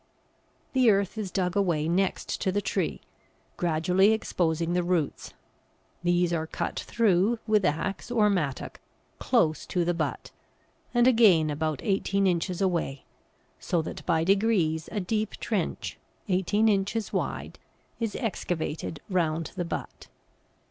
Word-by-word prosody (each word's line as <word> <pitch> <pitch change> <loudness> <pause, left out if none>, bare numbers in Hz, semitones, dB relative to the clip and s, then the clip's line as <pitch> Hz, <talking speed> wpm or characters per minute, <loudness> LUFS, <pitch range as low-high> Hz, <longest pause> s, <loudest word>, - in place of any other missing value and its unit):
The 255 -3 +5
earth 200 -1 +2
is 215 -3 -3
dug 180 -1 -1
away 170 -6 +1
next 185 +3 -1
to 190 - +1
the 205 - +1
tree, - - -2 0.5
gradually 180 +4 +3
exposing 170 -5 0
the 180 - +2
roots; 175 -4 -2 0.7
these 175 0 +2
are 160 -1 -1
cut - - -3
through 220 0 +2
with 215 -2 +3
axe 185 +8 -1
or 225 -3 +3
mattock 160 -10 -2 0.4
close 155 0 +2
to 175 -2 0
the 175 - +1
butt, 165 -2 -3 0.6
and 240 -1 +3
again 205 -11 +5
about 155 -1 -2
eighteen 195 0 +1
inches 180 0 0
away, 170 -8 -1 0.6
so 170 -2 0
that - - -7
by 165 -2 +2
degrees 190 -5 +2
a 215 - -1
deep 215 +3 -1
trench, - - -3 0.3
eighteen 200 +3 +2
inches 205 +1 0
wide, - - -3 0.4
is 225 -3 -2
excavated 165 - -3
round 165 -4 0
the 175 - -2
butt. - - -6
180 Hz, 135 wpm, -27 LUFS, 165-205 Hz, 0.7 s, The